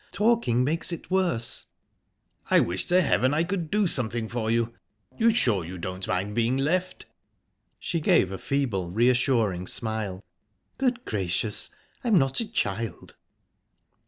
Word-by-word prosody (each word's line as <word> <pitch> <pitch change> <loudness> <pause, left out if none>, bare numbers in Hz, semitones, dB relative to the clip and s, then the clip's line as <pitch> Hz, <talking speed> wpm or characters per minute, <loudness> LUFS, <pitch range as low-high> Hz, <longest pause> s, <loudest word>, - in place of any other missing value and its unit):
Talking 210 - +2
makes 160 +6 -1
it 170 +2 -7
worse." 175 -12 0 0.8
"I - - +6
wish 90 +1 0
to 180 +1 +3
heaven 135 -1 +2
I 160 - +2
could 175 -2 -3
do 210 +2 +2
something 120 -8 -1
for 115 -1 -3
you!...You're 115 - -1
sure 120 - +3
you 90 +3 -7
don't 95 +2 -5
mind 95 +3 -1
being 120 +3 +1
left?" 180 +7 -1 0.7
She 170 - -2
gave 95 - +3
a 95 - -5
feeble, 120 -11 -1
reassuring 115 -3 +2
smile. 110 -4 -2 0.6
"Good 250 -2 0
gracious! 100 +1 -1 0.3
I'm 230 -5 +4
not 135 -3 +2
a 225 -2 -3
child." 110 - -3
120 Hz, 135 wpm, -26 LUFS, 105-170 Hz, 0.8 s, I